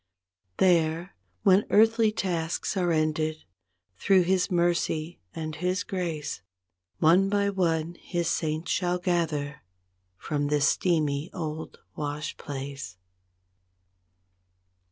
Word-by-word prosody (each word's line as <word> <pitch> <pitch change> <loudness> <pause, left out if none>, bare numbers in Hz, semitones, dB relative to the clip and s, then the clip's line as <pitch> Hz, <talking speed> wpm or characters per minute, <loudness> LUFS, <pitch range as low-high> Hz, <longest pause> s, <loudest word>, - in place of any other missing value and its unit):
There 170 0 +2 0.3
when 195 +1 +5
earthly 225 +1 +5
tasks 175 -4 -2
are 180 -2 +1
ended, 155 0 0 0.6
through 190 -2 +4
His 185 +2 +1
mercy 170 -2 0 0.2
and 155 -1 -4
His 180 +4 -1
grace. 170 - -3 0.6
One 180 +5 +4
by 200 0 +1
one 170 -3 0
His 175 -1 -2
saints 160 0 -1
shall 180 -1 +1
gather, 160 -5 -1 0.6
from 145 +6 -2
this 145 -1 +2
steamy 155 -3 +1
old 160 -3 -5 0.2
wash 150 +1 -4
place. 135 - -6
165 Hz, 100 wpm, -27 LUFS, 155-180 Hz, 0.6 s, when